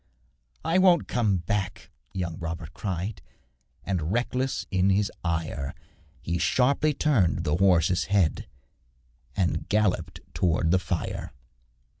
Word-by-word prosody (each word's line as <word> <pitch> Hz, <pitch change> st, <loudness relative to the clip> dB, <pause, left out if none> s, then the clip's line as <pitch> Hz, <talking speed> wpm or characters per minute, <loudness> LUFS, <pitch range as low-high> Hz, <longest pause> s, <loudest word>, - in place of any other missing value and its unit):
'I 170 Hz, +3 st, +3 dB
won't 180 Hz, -3 st, +5 dB
come 110 Hz, -6 st, +1 dB
back,' 95 Hz, 0 st, -3 dB, 0.2 s
young 85 Hz, -3 st, -4 dB
Robert 85 Hz, -1 st, -5 dB
cried, 95 Hz, +2 st, -4 dB, 0.6 s
And, 90 Hz, -3 st, -2 dB
reckless 125 Hz, +3 st, -1 dB
in 95 Hz, 0 st, +3 dB
his 100 Hz, +1 st, +2 dB
ire, 80 Hz, -5 st, -2 dB, 0.5 s
He 85 Hz, 0 st, -1 dB
sharply 140 Hz, -, +2 dB
turned 95 Hz, -, +2 dB
his 75 Hz, +2 st, +1 dB
horse's 90 Hz, -2 st, +3 dB
head 95 Hz, -5 st, +1 dB, 0.9 s
And 90 Hz, -2 st, 0 dB
galloped 105 Hz, -3 st, 0 dB
towards 80 Hz, -2 st, +1 dB
the 95 Hz, -, +4 dB
fire. 90 Hz, -2 st, -3 dB
95 Hz, 115 wpm, -27 LUFS, 85-105 Hz, 0.9 s, won't